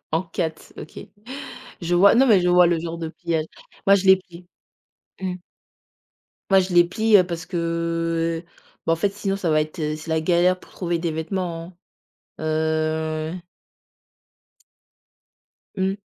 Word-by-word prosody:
en 160 Hz, -, +1 dB
4, 160 Hz, -3 st, -5 dB
OK. -, -, -9 dB, 0.8 s
Je 175 Hz, +1 st, -1 dB
vois, 195 Hz, +4 st, +6 dB
non 265 Hz, +3 st, +5 dB
mais 210 Hz, -6 st, +6 dB
je 180 Hz, -, +2 dB
vois 180 Hz, 0 st, +6 dB
le 170 Hz, -1 st, +2 dB
genre 165 Hz, 0 st, -5 dB
de 165 Hz, -, -4 dB
pliage. 160 Hz, -1 st, -2 dB, 0.4 s
Moi 195 Hz, -, +7 dB
je 195 Hz, -, -2 dB
les 190 Hz, 0 st, +8 dB
plie, 175 Hz, -1 st, -15 dB, 0.7 s
mmh. 185 Hz, -1 st, -2 dB, 1.2 s
Moi 195 Hz, 0 st, +6 dB
je 185 Hz, 0 st, -3 dB
les 175 Hz, 0 st, +7 dB
plie, 220 Hz, +4 st, +3 dB
heu, 185 Hz, -, +5 dB
parce 170 Hz, -2 st, -5 dB
que, 175 Hz, -, -6 dB, 0.9 s
heu, -, -, -34 dB, 0.4 s
beh 165 Hz, -, +3 dB
en -, -, +2 dB
fait 200 Hz, +4 st, 0 dB
sinon 200 Hz, -1 st, -2 dB
ça 180 Hz, -4 st, -1 dB
va 155 Hz, 0 st, +3 dB
être, 155 Hz, +3 st, -4 dB
c'est 155 Hz, +1 st, -3 dB
la 160 Hz, -1 st, 0 dB
galère 180 Hz, +2 st, +2 dB
pour -, -, -18 dB
trouver 175 Hz, -2 st, -2 dB
des 170 Hz, -1 st, -1 dB
vêtements, 170 Hz, +1 st, -4 dB, 0.6 s
heu 155 Hz, 0 st, -1 dB, 2.4 s
Mmh. 190 Hz, +1 st, -1 dB
170 Hz, 155 wpm, -23 LUFS, 160-185 Hz, 2.4 s, les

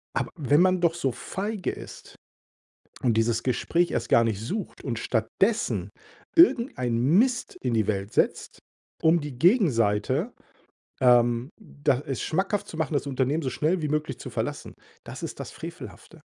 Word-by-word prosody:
Aber -, -, -1 dB
wenn 145 Hz, +2 st, +3 dB
man 185 Hz, -1 st, +3 dB
doch 170 Hz, -1 st, +3 dB
so 135 Hz, -6 st, -1 dB
feige 200 Hz, -, -4 dB
ist -, -, -11 dB, 0.9 s
und 120 Hz, -3 st, +2 dB
dieses 115 Hz, +1 st, +1 dB
Gespräch 170 Hz, +7 st, +1 dB
erst 115 Hz, -, -2 dB
gar 115 Hz, -, +5 dB
nicht 110 Hz, -3 st, -1 dB
sucht 190 Hz, -, -5 dB
und 120 Hz, -4 st, -3 dB
stattdessen 115 Hz, -, 0 dB, 0.5 s
irgendeinen 165 Hz, -, +4 dB
Mist 250 Hz, +1 st, 0 dB
in 125 Hz, -2 st, -1 dB
die 110 Hz, -2 st, +1 dB
Welt 100 Hz, -1 st, -2 dB
setzt, -, -, 0 dB, 0.4 s
um 160 Hz, +2 st, +4 dB
die 145 Hz, -4 st, -7 dB
Gegenseite, 140 Hz, -, +2 dB, 0.7 s
ähm 120 Hz, +1 st, +4 dB
da 145 Hz, -9 st, -1 dB
es 135 Hz, -3 st, -3 dB
schmackhaft 195 Hz, +4 st, -1 dB
zu 160 Hz, -, -8 dB
machen, 160 Hz, -1 st, -1 dB
das 145 Hz, 0 st, -1 dB
Unternehmen 140 Hz, +4 st, 0 dB
so 130 Hz, -, -1 dB
schnell 160 Hz, +7 st, 0 dB
wie 150 Hz, -, -1 dB
möglich 150 Hz, +1 st, -2 dB
zu -, -, -7 dB
verlassen, -, -, -4 dB, 0.3 s
das -, -, -9 dB
ist -, -, -6 dB
das -, -, -6 dB
Frevelhafte. -, -, -10 dB
140 Hz, 160 wpm, -26 LUFS, 120-175 Hz, 0.9 s, gar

